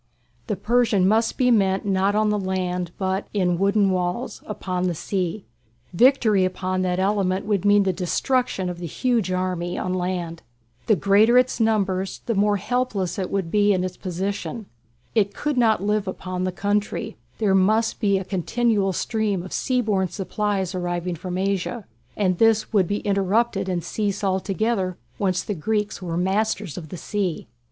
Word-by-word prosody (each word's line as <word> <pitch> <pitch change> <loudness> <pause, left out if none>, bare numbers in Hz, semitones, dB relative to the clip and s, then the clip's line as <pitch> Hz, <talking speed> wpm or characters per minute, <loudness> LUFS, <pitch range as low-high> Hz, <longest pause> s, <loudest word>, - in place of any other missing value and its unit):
The 210 - -1
Persian 215 -1 +2
must 225 +3 +2
be 250 -2 +3
met 195 -4 +2
not 195 +1 +1
on 215 0 +2
the 210 - 0
land, 180 -2 -2
but 190 0 -1
in 180 -3 +1
"wooden 200 0 +3
walls" 180 +6 -2
upon 185 -3 -2
the 175 - -1
sea. 185 +3 -3 0.5
Victory 225 -2 +4
upon 185 0 -1
that 180 -1 0
element 190 -1 0
would 205 -2 0
mean 205 0 +5
the 190 -1 +1
destruction 195 +3 0
of 175 -1 -5
the 175 - -5
huge 230 - 0
army 180 -1 -2
on 185 - -2
land. 180 -2 -3 0.5
The 215 - +5
greater 205 +6 +4
its 250 0 +2
numbers 195 -4 0
the 230 - 0
more 205 0 +2
helpless 205 -5 -1
would 190 -2 -2
be 205 -1 +4
its 185 -1 -2
position. 195 +4 -4 0.5
It 205 -3 +1
could 295 -1 -1
not 225 -5 +3
live 210 0 0
upon 185 -1 -3
"the 185 - -1
country"; 205 +3 -2 0.2
there 210 -3 +2
must 215 +4 +2
be 200 -3 +2
a 190 - -4
continual 200 +1 0
stream 210 -2 -1
of 185 - -8
sea 255 -2 +1
borne 200 -5 +1
supplies 195 0 -2
arriving 175 -1 -2
from 180 +2 -5
Asia, 195 +3 -2 0.3
and 185 -4 +1
this 225 -1 +3
would 195 -4 +3
be 205 +3 -2
interrupted 200 0 +1
and 175 -2 -1
cease 205 +2 -2
altogether 190 0 0 0.2
once 185 -3 0
the 210 - -3
Greeks 210 +4 -2
were 170 -2 -3
masters 195 -1 0
of 160 -4 -8
the 180 - -7
sea. 190 -2 -2
195 Hz, 165 wpm, -23 LUFS, 185-215 Hz, 0.5 s, mean